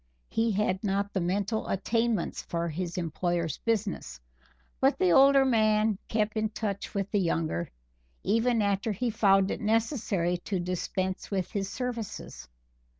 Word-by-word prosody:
He 225 +1 +1
had 190 -1 0
not 200 0 -1
the 190 - 0
mental 200 +5 -1
attainments 225 0 0
for 170 0 -3
his 170 +2 -4
employer's 170 -1 -1
business, 200 - -2 0.6
but - - +3
the 180 - +3
older 275 +4 +6
man 215 -4 +3
kept 215 -1 0
in 220 0 0
touch 210 -2 -4
with 195 0 -2
the 205 - +2
younger, 165 - -1 0.5
even 230 +2 +2
after 200 +2 0
he 235 +4 -1
found 195 -3 +4
it - - -4
necessary 215 - +1
to 185 +2 -3
dispense 185 +1 -3
with 190 -3 -2
his 195 -2 -2
services. 230 - -5
200 Hz, 145 wpm, -28 LUFS, 180-220 Hz, 0.6 s, older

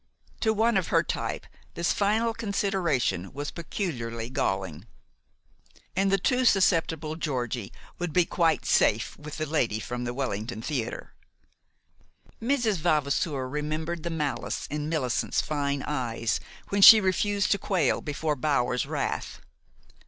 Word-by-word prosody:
To 220 - +2
one 220 0 +2
of 185 - 0
her - - +3
type - - -3 0.3
this 170 0 +1
final 220 +3 +1
consideration 190 - -1
was 145 +2 -4
peculiarly 120 - -4
galling. 95 - -2 1.1
And 195 +1 +2
the 195 - +4
too 250 +7 +1
susceptible 165 - +2
Georgie 125 -9 -3 0.3
would 175 -2 -2
be 180 +2 +3
quite 165 -3 +1
safe - - +2
with 150 0 -8
the 155 - -1
lady 125 -8 0
from 125 +2 -4
the 120 0 -3
Wellington 115 -3 -3
Theater. 130 -6 -4 1.3
Mrs. 235 -4 +1
Vavasour 150 -3 0
remembered 155 +4 -3
the 170 - -3
malice 150 -4 -2
in 150 0 -3
Millicent's 135 -7 0
fine 140 -2 -1
eyes 115 -5 -1 0.3
when 200 0 0
she 220 +3 +12
refused 200 +1 +1
to 200 - +3
quail 180 -9 +1
before 150 +1 -2
Bower's 125 -3 0
wrath. - - -3
155 Hz, 130 wpm, -27 LUFS, 130-190 Hz, 1.3 s, she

